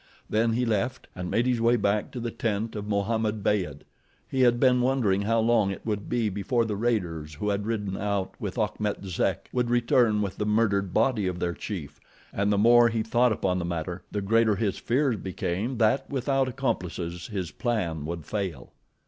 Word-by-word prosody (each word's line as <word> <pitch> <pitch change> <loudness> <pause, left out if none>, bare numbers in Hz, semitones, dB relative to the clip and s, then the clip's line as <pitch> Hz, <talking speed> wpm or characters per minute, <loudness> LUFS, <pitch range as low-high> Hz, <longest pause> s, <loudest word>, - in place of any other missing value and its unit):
Then 115 +1 +1
he 125 +2 +1
left, 115 +3 -1
and 90 -1 -4
made 115 - +1
his 125 -2 +1
way 115 +1 +4
back 105 -1 0
to 125 - -6
the 120 0 -3
tent 110 0 -2
of 105 -1 -5
Mohammed 105 +1 0
Beyd. 90 -10 0 0.5
He 130 - -1
had 120 -1 +4
been 125 -1 +4
wondering 120 -7 +2
how 115 +3 +1
long 110 -3 +3
it 95 - -6
would 105 -2 -3
be 120 -2 +1
before 105 +4 0
the 105 -2 -2
raiders 90 -9 -1
who 105 +8 -2
had 100 +1 -1
ridden 105 -4 -2
out 100 -2 -2
with - - -4
Achmet 105 -2 -1
Zek 95 -3 -1
would 125 -1 0
return 120 -3 +3
with 100 -2 -4
the 105 - -1
murdered 100 -3 +2
body 110 -2 +2
of 90 -1 -2
their 90 -1 -1
chief, 75 -8 -6 0.3
and 100 +1 +1
the 100 - +2
more 120 +3 +6
he 115 -1 -1
thought 120 +2 +3
upon 95 -3 0
the - - -2
matter 85 +1 -3
the 105 - -2
greater 110 +1 +3
his 100 -1 -1
fears 125 -1 +1
became, 95 +6 -3
that 110 +4 +2
without 135 0 +1
accomplices 90 -9 -3
his 95 -6 -4
plan 90 - -2
would 85 -2 -5
fail. 95 -9 -4
105 Hz, 195 wpm, -27 LUFS, 95-120 Hz, 0.5 s, more